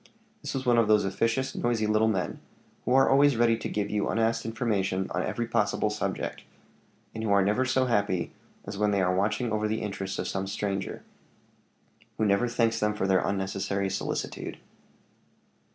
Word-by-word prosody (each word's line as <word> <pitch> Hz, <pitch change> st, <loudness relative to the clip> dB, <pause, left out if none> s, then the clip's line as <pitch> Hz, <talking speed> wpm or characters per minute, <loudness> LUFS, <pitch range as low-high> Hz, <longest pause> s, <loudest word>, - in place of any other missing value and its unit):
This -, -, -5 dB
was 135 Hz, 0 st, -3 dB
one 120 Hz, -1 st, +4 dB
of 115 Hz, -, +3 dB
those 105 Hz, -2 st, +4 dB
officious, 115 Hz, +7 st, 0 dB
noisy 120 Hz, -2 st, 0 dB
little 110 Hz, +1 st, +3 dB
men, 95 Hz, -5 st, -1 dB, 0.5 s
who 125 Hz, -, +1 dB
are 135 Hz, -, +6 dB
always 140 Hz, -1 st, +5 dB
ready 115 Hz, -1 st, +4 dB
to -, -, -5 dB
give 105 Hz, -1 st, -2 dB
you 105 Hz, -1 st, 0 dB
unasked 115 Hz, 0 st, 0 dB
information 100 Hz, -5 st, 0 dB
on -, -, -1 dB
every -, -, -2 dB
possible -, -, +1 dB
subject, -, -, -3 dB, 0.7 s
and 110 Hz, -, -5 dB
who 110 Hz, -, -1 dB
are 100 Hz, -1 st, +4 dB
never 105 Hz, +6 st, +2 dB
so 130 Hz, 0 st, +2 dB
happy 100 Hz, -7 st, 0 dB, 0.3 s
as 100 Hz, -, -6 dB
when 105 Hz, 0 st, +3 dB
they 100 Hz, -1 st, +2 dB
are 90 Hz, 0 st, +2 dB
watching 105 Hz, +4 st, 0 dB
over 110 Hz, 0 st, 0 dB
the 110 Hz, +1 st, -2 dB
interest 95 Hz, -2 st, -4 dB
of -, -, -2 dB
some 95 Hz, 0 st, -2 dB
stranger, 100 Hz, -1 st, -3 dB, 1.1 s
who 110 Hz, -, +1 dB
never 100 Hz, +4 st, +3 dB
thanks 115 Hz, -1 st, +1 dB
them 105 Hz, 0 st, +1 dB
for 105 Hz, -, -1 dB
their 95 Hz, -1 st, +3 dB
unnecessary 95 Hz, 0 st, -1 dB
solicitude. -, -, -4 dB
105 Hz, 180 wpm, -28 LUFS, 100-115 Hz, 1.1 s, are